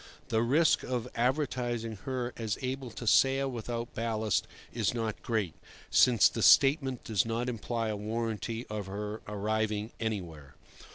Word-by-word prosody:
The 110 - +2
risk 145 +7 +3
of 125 -2 -3
advertising 120 -3 -1
her 125 -2 -2
as 110 -2 -2
able 130 0 -3
to 115 - -8
sail 135 +4 +4
without 120 0 -4
ballast 110 -4 0 0.3
is - - 0
not 110 -2 -3
great, 110 -8 -1 0.4
since 120 -5 +6
the - - -4
statement 135 -3 +5
does 105 -4 +1
not 115 +2 -2
imply 115 -1 -2
a 105 - -1
warranty 115 +2 -3
of 105 -2 -5
her 105 +2 -5
arriving 105 +1 -1
anywhere. 85 - -4
115 Hz, 145 wpm, -30 LUFS, 110-125 Hz, 0.4 s, since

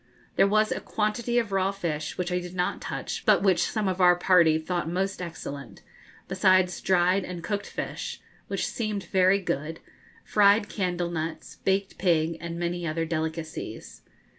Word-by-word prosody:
There 195 - +5
was 215 +1 +2
a - - -1
quantity 225 +3 -1
of 230 -4 +1
raw 195 0 +1
fish, 165 -6 -4
which 180 0 -2
I 180 - +1
did 180 0 -8
not 180 0 -1
touch, - - -4
but - - +4
which 190 -3 +4
some 215 -3 -1
of 185 0 -1
our 180 0 +7
party 175 -3 +4
thought 165 0 -2
most 190 +2 -2
excellent, 160 -5 -7 0.4
besides 185 -1 +3
dried 185 +1 +3
and 175 -2 -6
cooked 205 +3 -3
fish, - - -5 0.3
which - - -2
seemed 215 -4 -3
very 190 +1 +3
good, 160 -3 -3 0.4
fried 205 +1 +4
candle 180 -3 -2
nuts, 160 -1 -5
baked 195 +1 0
pig, 165 -3 +2
and 170 0 -5
many 175 0 -2
other 165 +1 -1
delicacies. 160 0 -5
180 Hz, 165 wpm, -27 LUFS, 170-195 Hz, 0.4 s, our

